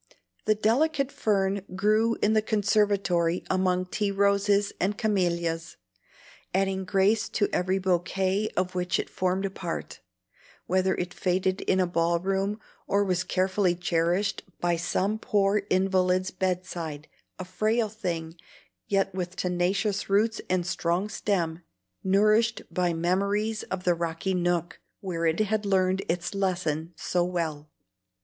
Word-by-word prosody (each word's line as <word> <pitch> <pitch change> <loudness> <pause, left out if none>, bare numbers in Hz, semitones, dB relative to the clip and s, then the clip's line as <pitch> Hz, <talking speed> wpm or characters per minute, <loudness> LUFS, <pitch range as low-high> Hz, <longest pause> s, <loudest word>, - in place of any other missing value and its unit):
The 215 - +3
delicate 275 +6 +1
fern 200 -2 0
grew 215 +4 +2
in 215 - +4
the 215 - +4
conservatory 200 -5 +1
among 185 -1 +1
tea 205 +2 -1
roses 200 0 +2
and 200 +2 0
camelias, 170 -5 -1 0.8
adding 190 0 0
grace 195 +3 +2
to 205 - +1
every 185 +2 +1
bouquet 190 +2 0
of 185 0 0
which 180 0 0
it - - -4
formed 185 +1 0
a 195 - -2
part, 175 -3 -5 0.6
whether 185 +1 +1
it 180 0 -4
faded 185 +1 0
in 190 - +1
a 185 - +4
ball 170 0 +1
room, 195 +3 -1 0.3
or 200 +1 +2
was 180 -3 0
carefully 185 -1 +1
cherished 175 +3 0 0.2
by 175 -1 +1
some 190 +5 -1
poor 205 -1 +2
invalid's 185 0 +2
bed 185 -1 -1
side, 155 -3 -6 0.3
a 185 - -6
frail 215 +5 +1
thing, 170 -7 -4 0.5
yet 195 -1 +1
with 180 -1 -4
tenacious 195 +3 0
roots 215 +3 +2
and 180 -1 +1
strong 175 +2 -1
stem, 175 -6 -1 0.4
nourished 215 +4 +3
by 175 0 +1
memories 200 +6 0
of 190 -1 -3
the 180 - +3
rocky 170 +2 -2
nook 175 -1 -1 0.2
where 170 -4 -2
it 160 +3 +1
had 215 0 0
learned 190 -1 +2
its 175 +2 -1
lesson 175 -5 -1
so 175 +1 0
well. 160 -4 -3
190 Hz, 140 wpm, -27 LUFS, 175-200 Hz, 0.8 s, in